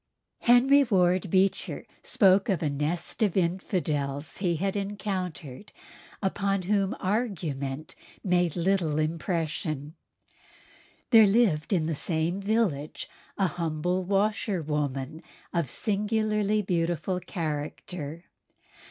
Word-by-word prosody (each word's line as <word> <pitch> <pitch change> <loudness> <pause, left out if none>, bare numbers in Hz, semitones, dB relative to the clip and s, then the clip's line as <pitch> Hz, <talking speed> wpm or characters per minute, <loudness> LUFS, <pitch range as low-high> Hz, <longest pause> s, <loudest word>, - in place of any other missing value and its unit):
Henry 265 +4 +6
Ward 185 -5 +2
Beecher 190 +2 +1 0.2
spoke 195 0 +4
of 185 -3 +1
a 150 - +1
nest 155 +8 -2
of 205 -4 +2
infidels 160 -5 -1
he 180 -3 0
had 195 +5 -1
encountered 195 -6 -4 0.5
upon 195 0 0
whom 195 +1 +1
argument 160 - -2 0.3
made 180 -4 +2
little 175 -4 +1
impression. 155 -2 -2 1.2
There 220 -3 +8
lived 195 -8 +2
in 175 -5 +2
the 165 - -1
same 165 +4 -1
village 195 -9 -1 0.3
a 195 - +2
humble 175 +1 -1
washerwoman 160 - -1 0.3
of 170 -7 0
singularly 210 - 0
beautiful 175 0 -1
character. 160 -1 -5
180 Hz, 100 wpm, -27 LUFS, 155-200 Hz, 1.2 s, There